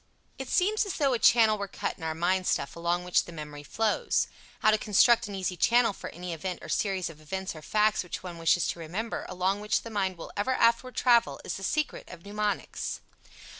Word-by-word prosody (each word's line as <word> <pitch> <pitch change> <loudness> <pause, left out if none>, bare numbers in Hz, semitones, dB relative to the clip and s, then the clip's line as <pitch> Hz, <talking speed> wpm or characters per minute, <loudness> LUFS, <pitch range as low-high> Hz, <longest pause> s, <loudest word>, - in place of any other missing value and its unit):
It 265 -1 -5
seems 425 +5 +2
as 385 - -3
though 275 -4 +2
a 240 - 0
channel 220 -2 +5
were 200 - -3
cut - - -4
in - - -13
our 160 -1 -2
mind 185 +3 +1
stuff - - 0
along 170 +1 -1
which 180 0 +2
the - - -10
memory 150 -2 -8
flows. 215 +8 0 0.4
How 215 - +5
to 215 - +2
construct 220 +2 +4
an 200 - -6
easy 185 -1 -2
channel 235 +3 +3
for - - -8
any 175 +1 -6
event 180 +3 -4
or - - -9
series 190 -3 0
of 155 -2 -11
events 190 +4 -4
or 155 - -9
facts 215 +5 +2
which 180 - -6
one 175 -2 -7
wishes 165 +1 +3
to - - -4
remember, 190 +8 -4
along 185 +2 0
which 210 - 0
the 230 - -8
mind 190 -3 -1
will 165 - -8
ever 205 +6 0
afterward 235 +1 +2
travel, 235 -2 +3
is - - -3
the - - -9
secret 305 +9 -2
of 170 -1 -12
mnemonics. 210 0 -3
195 Hz, 220 wpm, -28 LUFS, 175-225 Hz, 0.4 s, channel